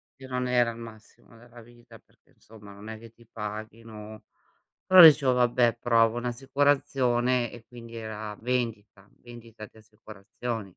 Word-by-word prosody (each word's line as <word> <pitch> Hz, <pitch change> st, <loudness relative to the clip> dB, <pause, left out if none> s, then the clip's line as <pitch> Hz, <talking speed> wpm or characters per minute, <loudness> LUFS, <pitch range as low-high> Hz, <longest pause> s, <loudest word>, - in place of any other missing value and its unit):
che 135 Hz, -1 st, -13 dB
non 125 Hz, 0 st, -3 dB
era 120 Hz, -2 st, +2 dB
il 115 Hz, -, -12 dB
massimo 115 Hz, 0 st, -14 dB
della 120 Hz, 0 st, -16 dB
vita, 120 Hz, +1 st, -18 dB
perché, -, -, -32 dB
insomma, 105 Hz, -2 st, -16 dB
non 105 Hz, +2 st, -12 dB
è 110 Hz, 0 st, -8 dB
che 115 Hz, -1 st, -14 dB
ti 115 Hz, +1 st, -23 dB
paghino 110 Hz, 0 st, -9 dB, 0.6 s
però, 185 Hz, -1 st, +8 dB
dicevo: 145 Hz, -5 st, +7 dB
"Vabbè, 120 Hz, -1 st, +1 dB
provo 115 Hz, -1 st, +2 dB
un'assicurazione" 125 Hz, -1 st, 0 dB
e 120 Hz, -2 st, -13 dB
quindi 115 Hz, -1 st, -12 dB
era 110 Hz, -1 st, -7 dB
vendita, 115 Hz, -5 st, -4 dB
vendita 115 Hz, -3 st, -13 dB
di 110 Hz, -, -22 dB
assicurazioni. 110 Hz, +1 st, -8 dB
115 Hz, 145 wpm, -26 LUFS, 110-125 Hz, 0.6 s, però